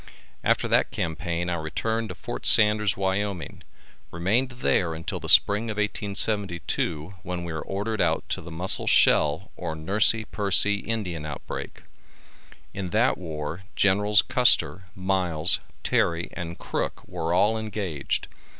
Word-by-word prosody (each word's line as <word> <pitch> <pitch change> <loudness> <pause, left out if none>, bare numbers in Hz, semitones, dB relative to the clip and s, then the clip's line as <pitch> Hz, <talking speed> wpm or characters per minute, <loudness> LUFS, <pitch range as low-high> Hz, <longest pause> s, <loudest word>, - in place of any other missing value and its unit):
After - - +1
that - - +2
campaign 85 +1 -3
I 90 - -1
returned 110 +8 -3
to 90 - -7
Fort 120 +6 -6
Sanders, 105 -2 +6
Wyoming, 95 -1 -3 0.5
remained 105 +10 +1
there 95 -9 0
until 80 - -5
spring 105 +3 +5
of 110 - -3
1872, 100 -5 -1
when 90 -1 -5
we 85 -2 -5
were 80 - -4
ordered 105 +5 -3
out 80 -2 0
to - - -3
the 85 - -10
Muscle 85 +4 0
Shell 75 +7 +3
or 80 - -5
Nursey 105 +7 +1
Pursey 100 0 +1
Indian 100 -9 -4
outbreak. 75 -3 -7 0.9
In 95 -2 -5
that 115 +4 +1
war 80 0 -6
Generals 105 +2 +3
Custer, 120 -6 +2
Miles, 90 -3 +3 0.2
Terry 85 0 0
and 85 -1 -6
Crook - - -4
were 80 +1 -4
all 105 +5 +3
engaged. 100 -10 -3
95 Hz, 130 wpm, -25 LUFS, 85-105 Hz, 0.9 s, Sanders